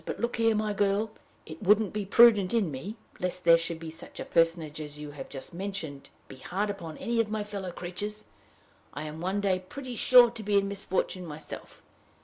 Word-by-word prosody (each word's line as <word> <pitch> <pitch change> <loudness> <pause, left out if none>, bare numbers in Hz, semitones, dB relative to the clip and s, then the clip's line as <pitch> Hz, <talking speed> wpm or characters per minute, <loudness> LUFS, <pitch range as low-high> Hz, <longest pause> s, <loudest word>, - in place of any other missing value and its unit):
But - - -5
look 235 +1 -1
here, 225 -1 +3
my 210 0 0
girl: 205 +2 +1 0.3
it 155 0 -10
wouldn't 210 0 +4
be 210 -1 -2
prudent 215 -2 +6
in 200 -9 +2
me, 165 +11 -6 0.2
lest 180 0 -2
there 170 -1 +9
should 165 0 -2
be 165 -1 -7
such 160 - -11
a - - -4
personage 165 -2 +1
as 150 -1 -7
you 150 -1 -7
have 140 -2 -8
just 135 +5 -8
mentioned, 170 -7 -5
to - - -15 0.2
be 130 - -11
hard 200 +9 -2
upon 165 -6 -8
any 235 0 -1
of 220 - -3
my 215 -1 -2
fellow 200 -3 -5
creatures: 205 +5 -3 0.7
I 145 - -4
am 155 +1 -7
one 190 +3 -1
day 190 -2 +2
pretty 250 +7 -7
sure 245 +1 +7
to 230 - -7
be 205 -1 +2
in 200 0 +2
misfortune 190 -2 -2
myself. 150 0 -9
190 Hz, 210 wpm, -29 LUFS, 165-210 Hz, 0.7 s, there